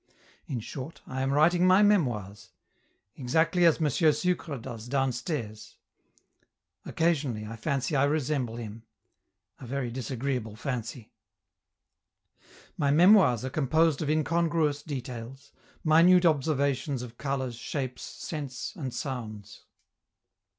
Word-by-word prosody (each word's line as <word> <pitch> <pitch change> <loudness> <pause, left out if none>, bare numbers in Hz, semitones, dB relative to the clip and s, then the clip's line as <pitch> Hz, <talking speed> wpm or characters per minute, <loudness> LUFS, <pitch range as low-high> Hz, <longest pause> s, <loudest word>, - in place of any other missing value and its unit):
In 130 - -3
short, 135 +7 -8
I 130 0 -4
am 135 +1 0
writing 175 +5 +4
my 185 +3 +6
memoirs, 120 - 0 0.6
exactly 160 +7 +2
as 165 -1 +4
M. 155 - +2
Sucre 160 0 +1
does 115 -1 -8
downstairs! 130 -3 -3 1.1
Occasionally 145 -10 0
I 115 +2 -7
fancy 140 +5 -2
I 135 0 +4
resemble 145 -5 -1
him 115 -1 -7 0.8
a 125 - -9
very 130 -1 -3
disagreeable 125 -2 -3
fancy. 120 -2 -5 1.6
My 140 - +1
memoirs 160 - +5
are 130 - -4
composed 155 +2 +2
of 150 - -2
incongruous 160 -1 +1
details, 135 -1 -7 0.3
minute 175 +3 +5
observations 140 -3 +1
of 120 -1 -11
colors, 135 -3 -2
shapes, 130 +2 -4
scents, 140 -2 -6
and 135 -8 -5
sounds. 110 -6 -6
135 Hz, 110 wpm, -28 LUFS, 120-155 Hz, 1.6 s, my